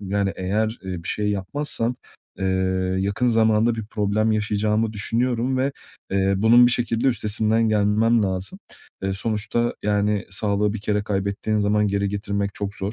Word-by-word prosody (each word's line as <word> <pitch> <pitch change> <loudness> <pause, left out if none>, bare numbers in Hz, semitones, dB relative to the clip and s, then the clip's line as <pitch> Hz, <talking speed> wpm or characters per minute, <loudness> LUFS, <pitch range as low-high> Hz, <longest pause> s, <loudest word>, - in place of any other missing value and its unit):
yani 100 0 -1
eğer, 110 +5 -1
eee, 90 -3 -5
bir - - -6
şey 105 -1 0
yapmazsam, 115 +4 -2 0.4
eee, 95 - -3 0.5
yakın 100 +6 0
zamanda 110 0 +3
bir 110 -2 -5
problem 110 +1 0
yaşayacağımı 105 +1 0
düşünüyorum 120 +4 0
ve, 135 +2 0 0.4
eee, 95 0 +2
bunun 115 +4 +6
bir 120 - +3
şekilde 120 +1 +1
üstesinden 110 0 +1
gelmem 110 +2 +3
lazım. 95 - -3 0.4
Eee, 95 0 -1
sonuçta 110 +3 -1
yani 105 -1 +1
sağlığı 100 +1 +1
bir 110 - -5
kere 105 0 0
kaybettiğin 100 +1 -2
zaman 105 0 +2
geri 100 0 0
getirmek 100 0 -2
çok 100 0 -4
zor, 100 +1 -4
105 Hz, 155 wpm, -23 LUFS, 100-115 Hz, 0.5 s, bunun